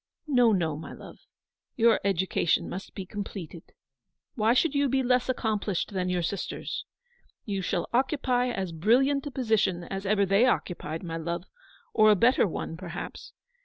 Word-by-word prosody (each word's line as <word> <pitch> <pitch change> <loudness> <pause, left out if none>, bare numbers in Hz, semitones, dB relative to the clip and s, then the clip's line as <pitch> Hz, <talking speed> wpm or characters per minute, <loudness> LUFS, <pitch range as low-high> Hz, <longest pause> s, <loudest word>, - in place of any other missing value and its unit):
"No, 245 -6 +4
no, 165 -6 +1
my 160 - -8
love. - - -12 0.6
Your 230 -1 +4
education 190 -3 +1
must 190 +3 -7
be 190 - -5
completed. 185 -4 -7 0.6
Why 225 +1 +2
should 300 +3 +2
you 285 -1 +2
be 265 +1 +1
less 250 0 +2
accomplished 215 -6 -1
than 185 -1 -1
your 180 -1 0
sisters? 195 +3 -4 0.6
You 200 -3 -2
shall 180 -1 -1
occupy 255 -1 +1
as 195 -7 -3
brilliant 260 - +2
a - - -5
position 220 -8 +1
as 195 +2 -5
ever 200 0 +3
they 195 +6 +4
occupied, 165 -8 -2
my 165 -2 -4
love, 170 +1 -3 0.5
or 215 -1 +6
a 210 - +7
better 230 +2 +4
one, 165 -1 -5
perhaps. 175 -1 -7
200 Hz, 160 wpm, -27 LUFS, 180-245 Hz, 0.6 s, a